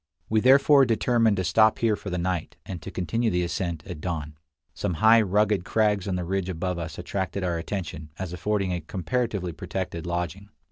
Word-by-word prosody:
We 110 - +3
therefore 140 +3 +6
determined 115 -2 +2
to 95 - 0
stop 110 +5 +4
here 115 -2 +2
for 100 - -7
the 90 - -2
night, 90 -1 -2
and 90 -4 -6
to - - -7
continue 110 +7 -1
the 90 -2 +1
ascent 85 -3 -3
at 90 -5 -7
dawn. 75 -4 -4 0.4
Some 90 - -2
high, 110 +4 +6
rugged 105 -1 +2
crags 105 -1 +1
on 95 - -1
the 90 -1 -2
ridge 95 +1 -1
above 90 0 -2
us 80 -1 -6
attracted 95 +2 -3
our 85 -2 -1
attention 85 -4 -5
as 90 -2 -5
affording 100 0 -1
a 90 - -3
comparatively 100 +2 -2
protected 85 +1 -5
lodging. 90 +3 -3
95 Hz, 190 wpm, -26 LUFS, 85-105 Hz, 0.4 s, therefore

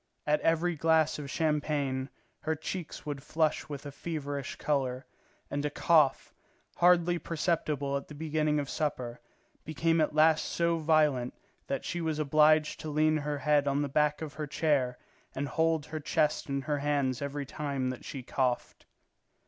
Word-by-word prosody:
At 150 0 +2
every 165 +1 +2
glass 160 0 +2
of 140 -2 -6
champagne 145 -4 0 0.3
her 160 0 -1
cheeks 165 +2 -6
would 145 -2 -4
flush 155 +2 0
with 145 -1 -6
a 145 - -5
feverish 145 -3 -4
colour, 135 -3 -1 0.5
and 145 0 -1
a 150 - 0
cough, 150 -1 +3 0.4
hardly 175 0 +4
perceptible 155 -4 -1
at 140 - -3
the 150 - -10
beginning 155 0 0
of 140 - -3
supper, 130 -6 -3 0.4
became 165 +2 +1
at 155 0 0
last 155 0 +4
so 170 -1 0
violent 150 -6 +2 0.3
that 135 - -3
she 175 - -3
was 160 -2 -1
obliged 155 +1 +4
to 155 - -5
lean 155 +1 +3
her 145 0 -2
head 145 0 +2
on 140 +1 +1
the - - -1
back 150 +2 +1
of 155 -2 -6
her 150 -1 -5
chair 140 -5 +1 0.4
and 140 +1 -2
hold 160 +1 +1
her 155 0 -5
chest 150 0 0
in 140 0 -1
her 145 +1 -1
hands 140 -3 0
every 140 0 -3
time 140 -2 -2
that 130 - -9
she 135 -3 -6
coughed. 125 -1 -2
150 Hz, 165 wpm, -30 LUFS, 140-155 Hz, 0.5 s, hardly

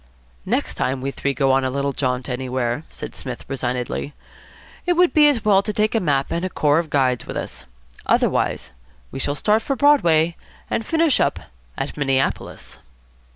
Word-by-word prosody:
"Next - - 0
time 130 +1 -1
we 135 +2 -3
three 140 0 -2
go 135 0 +2
on 135 0 +3
a 130 - 0
little 140 +1 -1
jaunt 125 -1 -1
anywhere," 130 +2 -2
said - - -8
Psmith 125 -3 -7
resignedly, 125 +1 -3 0.7
"it 355 - +4
would 355 0 +3
be 300 -1 +6
as 245 -7 -1
well 200 -2 +5
to 210 - -3
take 215 +1 +1
a 225 - +2
map 140 -7 0
and 170 - -1
a 185 - -1
corps 150 -2 +2
of 165 -2 -3
guides 130 -4 +1
with - - -5
us. - - -6 0.4
Otherwise - - +1 0.4
we - - -6
shall 145 +2 -1
start 210 +8 +2
for 275 - -2
Broadway 170 - +4 0.4
and 225 - 0
finish 325 +2 +2
up - - +1 0.4
at - - -4
Minneapolis." 135 -2 -2
145 Hz, 180 wpm, -21 LUFS, 130-210 Hz, 0.7 s, be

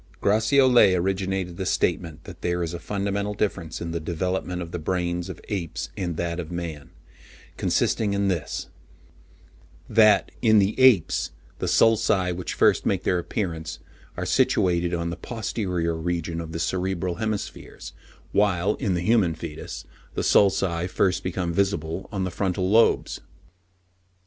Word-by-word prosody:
Gratiolet 110 0 +5
originated 95 -1 -1
the 95 - -3
statement 85 -4 -1
that - - -11
there 85 0 0
is 85 0 -4
a 85 - -5
fundamental 100 +1 -2
difference 85 -7 -2
in 85 0 -4
the 85 - -2
development 90 +2 -2
of 85 -2 -6
the 85 - -4
brains 90 +1 -2
of 95 - -7
apes 90 -6 -4
and 85 -4 -3
that 85 0 -2
of 85 -1 -6
man—consisting 85 +5 -3
in 100 0 +1
this; 85 -7 -2 1.2
that, 105 -5 +4
in 110 -2 +5
the 100 +1 +3
apes, 125 -10 +4 0.3
the - - -2
sulci 105 -5 +3
which 90 0 -4
first - - +4
make - - 0
their 90 - +1
appearance 85 -3 -4 0.4
are - - -2
situated 85 -1 +2
on 85 0 -2
the - - -3
posterior 95 -6 -2
region 85 0 -2
of 80 -1 -7
the 80 - -4
cerebral 90 0 -1
hemispheres, 110 -1 -5 0.4
while, 100 -1 +2
in 95 -3 0
the 85 - -1
human 95 -4 +2
foetus, 80 -2 -7 0.3
the - - -1
sulci 90 -3 +3
first 95 0 +1
become 90 -2 -2
visible 95 -2 -1
on 95 -3 -2
the 95 - -2
frontal 90 0 -1
lobes. 110 +4 +3
90 Hz, 145 wpm, -25 LUFS, 85-100 Hz, 1.2 s, Gratiolet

